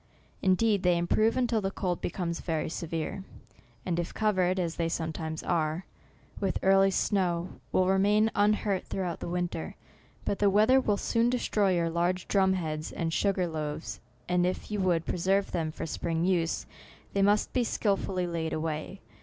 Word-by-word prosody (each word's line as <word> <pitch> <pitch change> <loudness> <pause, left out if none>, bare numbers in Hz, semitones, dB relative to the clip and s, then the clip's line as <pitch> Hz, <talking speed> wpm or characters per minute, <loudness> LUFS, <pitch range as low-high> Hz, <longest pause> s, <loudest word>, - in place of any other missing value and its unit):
Indeed, 200 +2 +3
they 180 -2 +3
improve, 215 +7 +2
until 240 -3 +1
the 195 - -1
cold 180 -2 -2
becomes 170 -1 -3
very 160 -3 -2
severe, 165 +3 -4 0.6
and 175 -2 -1
if 170 - -4
covered, 185 -4 +2
as 170 -2 -2
they 165 -1 0
some 160 -1 -2
times 160 -1 -5
are, 160 +1 0 0.5
with 195 -2 0
early 195 0 +5
snow, 180 -3 0
will 185 - +3
remain 205 +3 +3
un 205 +1 +4
hurt 200 -3 -1
throughout 180 -3 -3
the - - -5
winter. 175 - -3 0.5
But 200 - -1
the 205 - +4
weath 210 +5 +4
er 265 0 +6
will 210 -5 +1
soon 230 +3 +1
destroy 210 -6 +1
your 170 -1 0
large 175 +2 0
drum 190 -2 +3
heads 155 -4 -3
and 165 -1 -2
sugar 195 -1 +1
loaves, 150 - -4 0.3
and 180 0 +2
if 185 +3 -2
you 210 - -1
would 175 -3 +1
preserve 195 +3 +1
them 160 -2 -1
for - - -5
spring 165 +1 -2
use, 175 -3 +1 0.5
they 200 - +1
must 205 +1 +3
be 250 - +2
skilfully 195 -5 0
laid 165 -2 -2
away. 155 +4 -3
185 Hz, 175 wpm, -29 LUFS, 165-200 Hz, 0.6 s, er